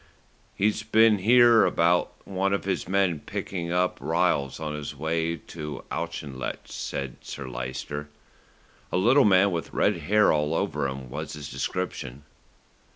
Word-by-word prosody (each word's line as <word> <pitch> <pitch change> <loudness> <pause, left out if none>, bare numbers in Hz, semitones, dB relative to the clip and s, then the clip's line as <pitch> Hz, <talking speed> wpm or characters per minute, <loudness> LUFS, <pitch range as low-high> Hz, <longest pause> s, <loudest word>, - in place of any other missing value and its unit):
"He's 105 +2 +1
been 110 -1 +4
here 120 +2 +6
about 85 +1 +2 0.2
one 100 0 0
of 100 - -1
his 95 -3 -2
men 95 -4 +1
picking 85 +2 -5
up 90 +1 +1
Ryles 80 -4 0
on 75 -1 -4
his 75 0 -5
way 80 +3 -1
to 75 -3 -8
Auchinlech," 75 -6 -4
said 70 -2 -5
Sir 70 -2 -7
Lyster. 65 +4 -5 0.8
"A - - +1
little 120 +9 +5
man 100 0 +5
with 85 -2 -4
red - - +2
hair 105 -1 +3
all 75 +1 0
over 70 - -1
him 65 -2 -7
was 75 +3 -5
his 75 -3 -7
description." 70 -7 -4
85 Hz, 145 wpm, -26 LUFS, 75-95 Hz, 0.8 s, here